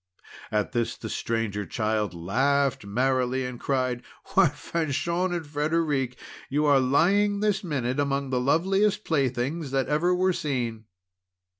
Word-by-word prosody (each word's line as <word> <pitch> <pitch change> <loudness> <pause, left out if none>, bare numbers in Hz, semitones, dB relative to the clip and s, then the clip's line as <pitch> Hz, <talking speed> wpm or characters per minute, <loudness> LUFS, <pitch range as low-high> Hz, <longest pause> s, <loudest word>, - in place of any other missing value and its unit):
At 105 -1 0
this 120 -1 -1
the - - -7
Stranger 110 -3 -2
Child 105 -2 -1
laughed 130 +7 +1
merrily, 130 +3 +1
and 125 -1 -6
cried: 130 -3 -1 0.3
"Why, - - +6
Fanchon 170 +3 -1
and 170 -2 -3
Frederic, 145 -3 0 0.3
you 150 +2 +1
are 140 -2 +5
lying 200 +10 +3
this 205 -1 +1
minute 135 -6 -2
among 140 -1 0
the 125 -1 +1
loveliest 195 +9 +2
playthings 140 +1 -1
that 135 0 0
ever 170 +5 +2
were 185 +1 +2
seen!" 120 -8 -3
140 Hz, 135 wpm, -26 LUFS, 125-165 Hz, 0.3 s, Why